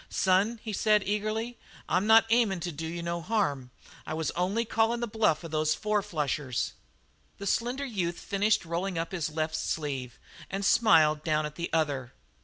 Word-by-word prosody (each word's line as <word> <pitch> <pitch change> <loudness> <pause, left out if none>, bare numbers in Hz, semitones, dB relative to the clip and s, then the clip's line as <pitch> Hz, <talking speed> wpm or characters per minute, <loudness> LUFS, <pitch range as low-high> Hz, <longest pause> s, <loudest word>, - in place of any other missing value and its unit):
"Son," 200 +5 +2
he 220 - -4
said 210 0 +3
eagerly, 215 +3 -2 0.3
"I'm 190 +3 +1
not 225 0 +7
aiming 225 -6 +3
to 175 - -3
do 160 +1 -5
you 170 +1 -5
no 170 0 -2
harm. 155 - -1 0.3
I 155 - -4
was 160 -1 -1
only 195 +6 0
calling 225 +1 +1
the 240 - -1
bluff 210 -8 +1
of 165 - -7
those 155 0 +1
four 210 -1 0
flushers." 150 - -2 0.6
The 200 - -7
slender 245 +7 0
youth 180 -9 -2
finished 205 -1 +1
rolling 175 +2 -2
up 165 0 -2
his 170 -5 -2
left 155 0 -2
sleeve 145 -5 -3 0.3
and 195 +1 -3
smiled 155 -9 +4
down 155 -1 +1
at 150 - -5
the 170 +1 -4
other. 140 -6 -1
180 Hz, 180 wpm, -29 LUFS, 155-215 Hz, 0.6 s, not